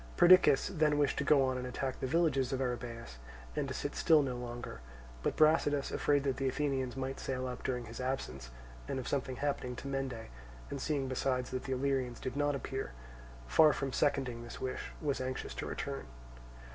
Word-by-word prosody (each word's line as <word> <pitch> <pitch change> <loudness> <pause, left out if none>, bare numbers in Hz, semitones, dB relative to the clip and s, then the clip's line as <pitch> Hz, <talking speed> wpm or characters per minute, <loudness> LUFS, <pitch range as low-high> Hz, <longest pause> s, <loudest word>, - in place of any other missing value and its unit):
Perdiccas 175 -5 +7
then 155 -5 +2
wished 145 -1 +2
to - - +1
go 140 -1 +5
on 130 -1 0
and 125 - -4
attack 130 +1 -3
the - - -1
villages 140 -4 +2
of 135 - -1
Arrhabaeus, 120 - -4 0.4
and - - 0
to - - -3
sit - - -3
still 155 -2 +5
no 130 -2 -2
longer; 120 - -6 0.4
but - - 0
Brasidas, 155 -2 +3
afraid 145 -1 +2
that 135 -3 0
the 135 0 0
Athenians 135 -2 -1
might 135 0 -3
sail 130 -1 -2
up 125 -1 -5
during 125 -2 -2
his 115 +2 -7
absence, 70 - -3 0.4
and - - -2
of 130 - -4
something 130 -2 -1
happening 140 -2 -2
to 140 - -7
Mende, 135 -4 -3 0.4
and 140 - -4
seeing 140 -3 0
besides 130 -1 -1
that 130 - -3
the 135 - -1
Illyrians 130 -2 0
did 130 - -4
not 145 0 +1
appear, 135 - -4 0.5
far 150 - +6
from 135 -1 -3
seconding 135 -5 +1
this 120 - -8
wish 130 -1 -4
was 140 -3 0
anxious 130 0 -3
to - - -4
return. - - -4
130 Hz, 195 wpm, -33 LUFS, 125-140 Hz, 0.5 s, Perdiccas